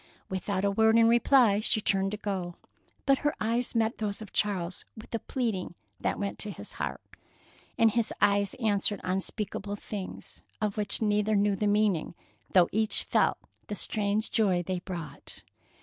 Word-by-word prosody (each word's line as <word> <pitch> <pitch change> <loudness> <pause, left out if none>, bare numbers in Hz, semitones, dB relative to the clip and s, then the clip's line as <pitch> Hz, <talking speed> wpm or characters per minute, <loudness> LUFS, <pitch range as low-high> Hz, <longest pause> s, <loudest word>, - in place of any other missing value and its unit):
Without 190 +1 -2
a 200 - +2
word 220 +2 +4
in 230 0 +6
reply, 235 -2 +5
she 215 0 +2
turned 195 -2 +1
to 210 - -4
go, 190 -4 -3 0.5
but 275 -1 +4
her 295 +1 0
eyes 235 +3 -1
met 225 0 +1
those 205 -2 -2
of 215 -3 -10
Charles 185 -4 -1
with 220 - -11
a 230 - 0
pleading 220 -8 -3 0.2
that - - -1
went 200 -1 -3
to 210 - -1
his - - -8
heart, - - -4 0.7
and 225 -1 +5
his 230 0 +1
eyes 200 -1 +3
answered 205 -4 +1
unspeakable 200 +2 -2
things, 205 -2 -8 0.2
of 210 -2 -1
which 210 +1 +1
neither 210 0 +2
knew 205 0 +3
the 210 +2 0
meaning, 205 -6 +1 0.4
though 180 -2 +6
each 220 +1 +1
felt - - +2 0.3
the 210 - -4
strange 205 +2 0
joy 190 -6 +2
they 185 +1 -2
brought. 175 -4 -7
205 Hz, 165 wpm, -29 LUFS, 195-220 Hz, 0.7 s, in